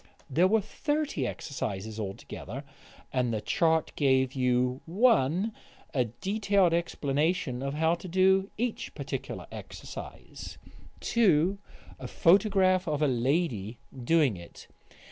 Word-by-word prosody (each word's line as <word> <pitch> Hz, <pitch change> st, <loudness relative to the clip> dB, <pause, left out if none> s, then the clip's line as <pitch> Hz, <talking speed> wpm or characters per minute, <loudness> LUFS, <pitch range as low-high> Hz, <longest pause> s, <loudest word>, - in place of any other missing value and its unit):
There 170 Hz, +7 st, +4 dB
were 220 Hz, +2 st, +3 dB
thirty 290 Hz, -, -2 dB
exercises 110 Hz, -6 st, -5 dB
altogether, 105 Hz, +5 st, -6 dB, 0.5 s
and 125 Hz, -2 st, +1 dB
the 110 Hz, -, -1 dB
chart 160 Hz, +7 st, +1 dB
gave 130 Hz, -2 st, +2 dB
you: 125 Hz, 0 st, +1 dB
(1) 185 Hz, -, +3 dB, 0.4 s
A 130 Hz, -4 st, +2 dB
detailed 195 Hz, -, +1 dB
explanation 150 Hz, -4 st, 0 dB
of 140 Hz, +1 st, -3 dB
how 160 Hz, +2 st, +2 dB
to 175 Hz, +2 st, -6 dB
do 190 Hz, +2 st, +3 dB
each 235 Hz, +1 st, -3 dB
particular -, -, -5 dB
exercise; -, -, -9 dB, 0.4 s
(2) 195 Hz, -4 st, +3 dB, 0.4 s
A -, -, -6 dB
photograph 185 Hz, 0 st, +3 dB
of 150 Hz, -1 st, 0 dB
a -, -, +4 dB
lady 125 Hz, -, 0 dB, 0.2 s
doing 135 Hz, -, +2 dB
it. 85 Hz, -1 st, -12 dB
160 Hz, 115 wpm, -29 LUFS, 125-190 Hz, 0.5 s, There